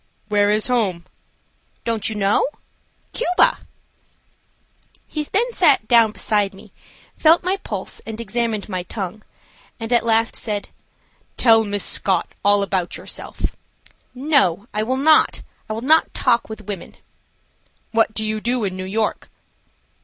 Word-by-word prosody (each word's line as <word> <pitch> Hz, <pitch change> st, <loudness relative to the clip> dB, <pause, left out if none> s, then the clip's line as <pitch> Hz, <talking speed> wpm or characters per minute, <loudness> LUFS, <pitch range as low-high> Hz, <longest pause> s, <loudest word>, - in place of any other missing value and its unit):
"Where 205 Hz, -1 st, +3 dB
is 215 Hz, +1 st, +2 dB
home?" 200 Hz, -9 st, 0 dB, 0.8 s
"Don't 225 Hz, -2 st, -1 dB
you 220 Hz, -, -5 dB
know? 200 Hz, +3 st, +2 dB, 0.7 s
Cuba." 360 Hz, -7 st, +2 dB, 1.5 s
He 305 Hz, -, -4 dB
then 465 Hz, +9 st, 0 dB
sat 275 Hz, -, +3 dB
down 230 Hz, -2 st, +5 dB
beside 205 Hz, -2 st, 0 dB
me, -, -, -16 dB, 0.4 s
felt 325 Hz, +2 st, +5 dB
my 370 Hz, +2 st, 0 dB
pulse, -, -, -6 dB
and 220 Hz, 0 st, -7 dB
examined 230 Hz, -1 st, -2 dB
my 185 Hz, -3 st, -3 dB
tongue, 195 Hz, +2 st, -6 dB, 0.6 s
and 225 Hz, +1 st, -3 dB
at 235 Hz, -, +4 dB
last 225 Hz, 0 st, +2 dB
said: 210 Hz, -3 st, -3 dB, 0.7 s
"Tell 225 Hz, -2 st, +5 dB
Miss 205 Hz, -1 st, -2 dB
Scott 190 Hz, -, +1 dB, 0.2 s
all 205 Hz, 0 st, +4 dB
about 190 Hz, -3 st, -2 dB
yourself." -, -, -5 dB, 0.6 s
"No, 250 Hz, -, +2 dB
I 210 Hz, -, 0 dB
will 255 Hz, +4 st, -1 dB
not. 310 Hz, +3 st, +4 dB, 0.3 s
I -, -, -2 dB
will 220 Hz, -, -4 dB
not 315 Hz, +6 st, +3 dB
talk 235 Hz, -3 st, +2 dB
with 220 Hz, -1 st, -8 dB
women." 200 Hz, -4 st, -7 dB, 1.0 s
"What 225 Hz, -1 st, +2 dB
do 220 Hz, -, -1 dB
you 215 Hz, 0 st, -2 dB
do 240 Hz, 0 st, 0 dB
in 190 Hz, -2 st, -2 dB
New 185 Hz, 0 st, -5 dB
York?" 215 Hz, +3 st, -2 dB
220 Hz, 140 wpm, -21 LUFS, 205-245 Hz, 1.5 s, down